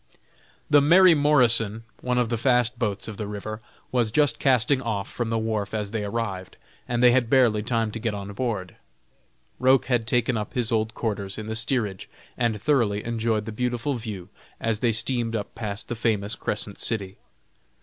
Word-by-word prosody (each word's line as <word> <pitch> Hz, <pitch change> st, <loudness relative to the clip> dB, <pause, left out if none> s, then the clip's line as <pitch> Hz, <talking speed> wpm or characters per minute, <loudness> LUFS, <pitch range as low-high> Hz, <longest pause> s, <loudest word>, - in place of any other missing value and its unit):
The 145 Hz, -1 st, +5 dB
"Mary 175 Hz, +4 st, +7 dB
Morrison," 120 Hz, -7 st, +3 dB, 0.2 s
one 125 Hz, 0 st, -1 dB
of 120 Hz, -2 st, +1 dB
the 120 Hz, -, 0 dB
fast 125 Hz, -1 st, +2 dB
boats 105 Hz, -4 st, -2 dB
of 110 Hz, -2 st, -7 dB
the 105 Hz, -, -4 dB
river, 105 Hz, +1 st, -6 dB, 0.3 s
was 120 Hz, -3 st, +1 dB
just 130 Hz, 0 st, +2 dB
casting 130 Hz, +1 st, +3 dB
off 110 Hz, -5 st, -2 dB
from 120 Hz, -2 st, -4 dB
the 115 Hz, -, 0 dB
wharf 110 Hz, -2 st, -2 dB
as 105 Hz, -2 st, -3 dB
they 110 Hz, -2 st, -2 dB
arrived, 100 Hz, -3 st, -4 dB, 0.3 s
and 120 Hz, 0 st, 0 dB
they 125 Hz, -, +8 dB
had 120 Hz, -2 st, +2 dB
barely 120 Hz, -5 st, +4 dB
time 115 Hz, -1 st, -1 dB
to 115 Hz, -, -6 dB
get 110 Hz, -2 st, -2 dB
on 100 Hz, 0 st, -6 dB
board. 105 Hz, -5 st, -3 dB, 0.8 s
Roch 130 Hz, 0 st, +4 dB
had 120 Hz, -3 st, 0 dB
taken 120 Hz, 0 st, +1 dB
up 105 Hz, -1 st, -5 dB
his 120 Hz, -2 st, -1 dB
old 110 Hz, 0 st, 0 dB
quarters 100 Hz, -4 st, -3 dB
in 110 Hz, -, -5 dB
the 110 Hz, 0 st, -4 dB
steerage, 110 Hz, -4 st, -1 dB, 0.3 s
and 115 Hz, -3 st, 0 dB
thoroughly 115 Hz, -5 st, +1 dB
enjoyed 115 Hz, -2 st, -1 dB
the 110 Hz, -, -5 dB
beautiful 125 Hz, +4 st, -1 dB
view 105 Hz, -7 st, -6 dB, 0.3 s
as 110 Hz, -2 st, -1 dB
they 120 Hz, -1 st, +2 dB
steamed 115 Hz, +1 st, -1 dB
up 105 Hz, -2 st, -4 dB
past 105 Hz, -3 st, -5 dB
the -, -, -3 dB
famous 110 Hz, -2 st, -1 dB
Crescent 105 Hz, -1 st, -4 dB
City. 100 Hz, -5 st, -3 dB
115 Hz, 185 wpm, -25 LUFS, 105-125 Hz, 0.8 s, they